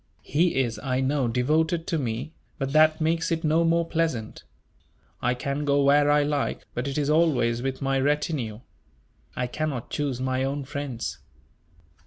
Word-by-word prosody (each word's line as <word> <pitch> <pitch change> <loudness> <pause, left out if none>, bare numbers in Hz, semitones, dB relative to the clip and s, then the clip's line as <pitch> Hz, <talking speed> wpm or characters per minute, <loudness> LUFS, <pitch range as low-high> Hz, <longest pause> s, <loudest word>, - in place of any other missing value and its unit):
He 165 +5 +1
is, 120 -4 -1
I 130 -2 -1
know, 135 -1 +1
devoted 155 +8 +1
to 165 - -1
me; 125 +4 -3 0.2
but 135 -2 -3
that 155 +1 +5
makes 165 +2 +1
it 165 0 -1
no 160 +2 +3
more 165 0 +2
pleasant. 160 -10 -2 0.8
I 125 0 +1
can 140 +3 -3
go 140 -1 +2
where 145 +1 +5
I 145 0 +4
like, 145 -1 -1
but 120 +3 -3
it 140 - -3
is 145 -2 0
always 135 -8 +2
with 135 +1 -3
my 135 0 +1
retinue. 135 -5 -1 0.7
I 125 - -1
cannot 135 -1 -3
choose 140 -4 -2
my 130 0 0
own 140 +1 -2
friends." 140 -4 -5
140 Hz, 165 wpm, -26 LUFS, 130-155 Hz, 0.8 s, that